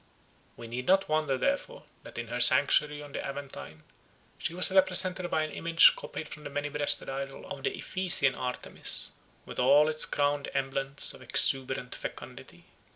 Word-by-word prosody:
We 115 - -9
need 125 +2 -6
not 190 +1 +3
wonder, 155 -3 0
therefore, 285 - -2 0.2
that - - -12
in - - -6
her - - -4
sanctuary 150 0 +3
on 145 - -12
the - - -5
Aventine 135 - -8 0.6
she 165 - -3
was 185 +1 +5
represented 185 -1 +3
by 155 - 0
an 155 - -5
image 165 +2 +5
copied 155 - -7
from 150 - -10
the - - -7
many 145 +1 -3
breasted 145 0 0
idol 135 0 -6
of 135 - -8
the - - -3
Ephesian 175 -8 0
Artemis, 125 0 -1 0.3
with - - -8
all 145 +4 +5
its 155 0 0
crowded 145 0 -1
emblems 135 +1 0
of - - -13
exuberant 130 -2 0
fecundity. - - -9
145 Hz, 165 wpm, -29 LUFS, 135-165 Hz, 0.6 s, was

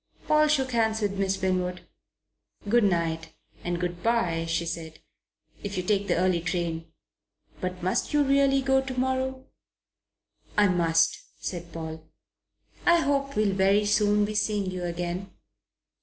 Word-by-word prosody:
Paul 305 0 +4
shook 270 -4 +1
hands 220 -2 +1
with 200 -1 -1
Miss 195 0 0
Winwood. 180 -1 -1 0.8
"Good 235 +1 +4
night 165 -3 -1 0.3
and 175 0 -2
good 175 0 -3
bye," 180 -8 +1
she 165 +1 -1
said, 160 -1 -5 0.6
"if 200 -1 -5
you 180 - -1
take 200 +1 +1
the - - +2
early 180 -1 +2
train. 170 -2 -3 0.7
But 180 -1 -4
must 185 - 0
you 295 -1 +3
really 275 0 +3
go 265 0 +3
to 260 -1 -4
morrow?" 260 0 -1 1.1
"I 205 -1 +5
must," 165 -2 +2 0.2
said 170 -2 -6
Paul. 160 -1 -6 0.8
"I 345 -1 +5
hope 275 -1 0
we'll 210 -2 +2
very 195 +2 +3
soon 210 0 +3
be 215 - -4
seeing 210 -2 0
you 180 -1 -4
again. 175 +2 -3
195 Hz, 145 wpm, -27 LUFS, 175-235 Hz, 1.1 s, I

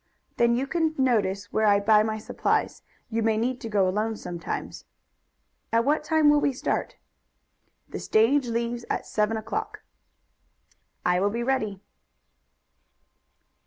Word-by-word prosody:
"Then 235 0 +3
you 255 +3 0
can 320 +1 0
notice 205 -7 0
where 220 0 +2
I 200 -1 +5
buy 210 +1 +5
my 220 0 -1
supplies. 215 - -1 0.3
You 225 +1 0
may 220 -1 +1
need 245 +3 -1
to 225 - -5
go 200 -3 +2
alone 215 +4 -1
sometimes." 175 -3 -6 0.9
"At 230 +1 +2
what 300 +2 +1
time 315 0 +3
will 295 0 +5
we 280 - +1
start?" 250 - -2 0.9
"The - - -6
stage 245 +5 +2
leaves 235 +1 -2
at - - -2
seven 215 +1 0
o'clock." 220 - -5 1.2
"I 180 0 +3
will 200 +2 +2
be 235 +3 -3
ready." 220 -7 -1
225 Hz, 140 wpm, -26 LUFS, 210-255 Hz, 1.2 s, I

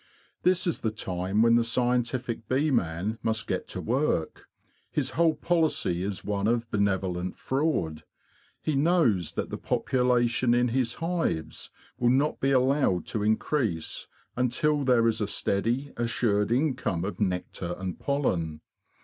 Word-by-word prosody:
This 180 0 +2
is 170 - -1
the 110 - 0
time 95 -1 -1
when 115 0 +5
the 120 0 +4
scientific 120 0 -1
bee 145 +4 +2
man 100 0 -1
must 110 0 -1
get - - -3
to - - -6
work. 125 - -1 0.4
His 130 -3 -1
whole 160 +3 +3
policy 155 - +1
is 95 0 -4
one 100 0 0
of 120 0 +1
benevolent 95 -3 0
fraud. 130 - -1 0.6
He 155 - 0
knows 135 - +2
that - - -3
the - - -4
population 125 -1 +1
in 120 0 +2
his 125 -1 0
hives 165 - -2 0.3
will 120 - +3
not 140 +4 +2
be 135 - +1
allowed 130 - +2
to 110 - -1
increase 110 - -1 0.3
until 140 +4 +1
there 125 -3 +4
is 115 -1 0
a 105 - 0
steady, 115 +8 -1
assured 115 -3 0
income 125 - 0
of 95 -3 -5
nectar 90 -2 -2
and 95 -1 -5
pollen. 85 - -1
115 Hz, 145 wpm, -27 LUFS, 100-135 Hz, 0.6 s, when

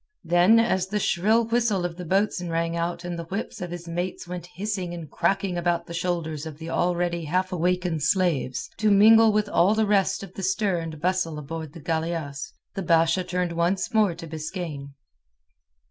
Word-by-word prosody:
Then 175 +6 +5
as 190 -5 +1
the 210 +2 -1
shrill 215 +5 +2
whistle 230 -6 +1
of 175 -1 -4
the 180 0 -7
boatswain 190 -1 0
rang 165 0 -1
out 170 +1 -2
and 175 -1 -4
the 170 - -5
whips 195 +4 -5
of 175 - -4
his 175 0 -7
mates 175 +1 -4
went 175 -1 -6
hissing 190 -3 -3
and 165 -2 -7
cracking 190 0 0
about 170 0 0
the 170 - -8
shoulders 165 -3 -2
of 155 -2 -8
the 165 +1 -7
already 175 -1 0
half 185 +4 0
awakened 180 -2 0
slaves, 160 -6 +1
to 215 -1 +2
mingle 220 +2 +7
with 210 0 +1
all 195 +1 +3
the 220 0 +2
rest 200 -1 +1
of 190 -2 -10
the 195 - -7
stir 190 -1 +1
and 160 -2 -6
bustle 175 -2 0
aboard 155 0 -6
the - - -10
galeasse, 160 +1 -3 0.2
the 195 - -4
Basha 165 +1 +3
turned 180 -1 -2
once 175 +6 0
more 210 -6 +3
to 165 - -8
Biskaine. 155 -3 -6
175 Hz, 190 wpm, -25 LUFS, 165-195 Hz, 0.2 s, mingle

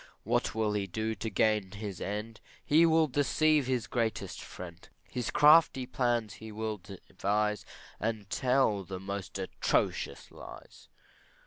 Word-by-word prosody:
What - - 0
will 110 -1 +1
he 100 -2 -1
do 110 +5 -2
to 110 +2 -4
gain 105 -1 +1
his 100 -3 -6
end? 105 +2 -4 0.3
He 160 +3 +5
will 160 0 +4
deceive 145 +1 +2
his 125 -4 0
dearest 115 -3 -2
friend, 85 -2 -10 0.2
His 125 -3 -2
crafty 150 -3 +6
plans 120 -4 0
he 110 +1 -10
will 110 0 -3
devise, 105 +2 -2 0.3
And 110 -2 -2
tell 125 -5 +2
the 95 0 -6
most 100 0 -5
atrocious - - -1
lies. - - -12
110 Hz, 135 wpm, -30 LUFS, 100-125 Hz, 0.3 s, crafty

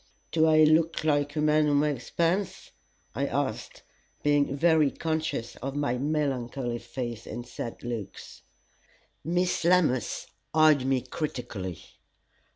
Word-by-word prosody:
"Do 160 0 +3
I 155 0 +6
look 160 +1 +3
like 145 -1 +1
a 150 - 0
man 150 0 +3
who 145 - +2
makes 145 -4 0
puns?" 175 +3 -1 0.4
I - - -1
asked, - - -3 0.4
being 145 -1 +2
very 160 -2 +4
conscious 155 -7 -3
of 135 +2 -5
my 140 -4 -1
melancholy 135 -4 -1
face 120 -1 -6
and 120 - -6
sad 120 -1 -7
looks. 115 -5 -7 0.8
Miss 175 +1 0
Lammas 170 -8 +2 0.3
eyed 155 -4 +5
me 135 -1 +2
critically. 120 - -5
145 Hz, 125 wpm, -27 LUFS, 125-155 Hz, 0.8 s, I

